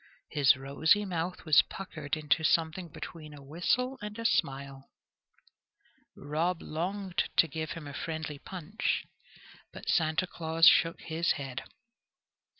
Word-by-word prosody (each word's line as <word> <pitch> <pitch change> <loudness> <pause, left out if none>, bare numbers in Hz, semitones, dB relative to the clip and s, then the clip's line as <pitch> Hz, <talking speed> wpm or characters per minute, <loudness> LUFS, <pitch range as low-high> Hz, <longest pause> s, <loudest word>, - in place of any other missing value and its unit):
His 145 -2 +5
rosy 160 +9 +2
mouth 175 -1 -3
was 155 -3 +7
puckered 155 -6 -5
into 155 +1 +1
something 165 +2 +1
between 155 -1 -9
a 140 - -12
whistle 235 - 0
and 210 +1 -6
a 230 - -5
smile. 135 -7 -1 1.3
Rob 160 +5 -1
longed 185 +3 -2
to 165 - +6
give 160 +1 -4
him 165 -3 -8
a 145 - -7
friendly 160 -1 -4
punch, 185 +5 -3 0.7
but - - -11
Santa 160 +1 +2
Claus 165 -1 +1
shook 165 0 +5
his 165 +1 0
head. 135 -2 -6
160 Hz, 130 wpm, -30 LUFS, 150-180 Hz, 1.3 s, was